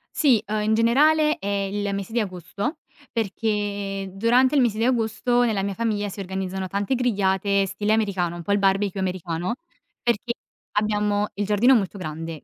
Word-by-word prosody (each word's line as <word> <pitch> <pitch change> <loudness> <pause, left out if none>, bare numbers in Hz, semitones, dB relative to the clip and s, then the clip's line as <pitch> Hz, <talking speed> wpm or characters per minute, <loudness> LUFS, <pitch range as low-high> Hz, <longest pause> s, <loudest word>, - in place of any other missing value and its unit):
Sì, 250 -8 +4
uhm, 210 +1 -1
in 215 +1 +2
generale 300 +8 +4
è 200 - -5
il 200 0 -1
mese 200 +2 -5
di 235 - +1
agosto, 190 - -4 0.3
perché 205 -3 -2
durante 245 +7 +3
il 275 - +5
mese 225 -3 +1
di 225 - 0
agosto 240 0 +1
nella 210 -4 0
mia 200 0 -2
famiglia 210 -2 -1
si 200 - -9
organizzano 190 0 -3
tante 200 +7 -1
grigliate 200 -4 +1
stile 205 +3 -1
americano, 190 -6 0
un 175 - -6
po' 200 - -2
il 205 - +3
barbecue 195 0 +1
americano, 180 +1 -2 0.5
perché 235 0 0 0.4
abbiamo 210 0 +1
il 205 0 -1
giardino 215 +6 +4
molto 200 -3 0
grande. 160 -2 -6
205 Hz, 170 wpm, -24 LUFS, 195-230 Hz, 0.5 s, il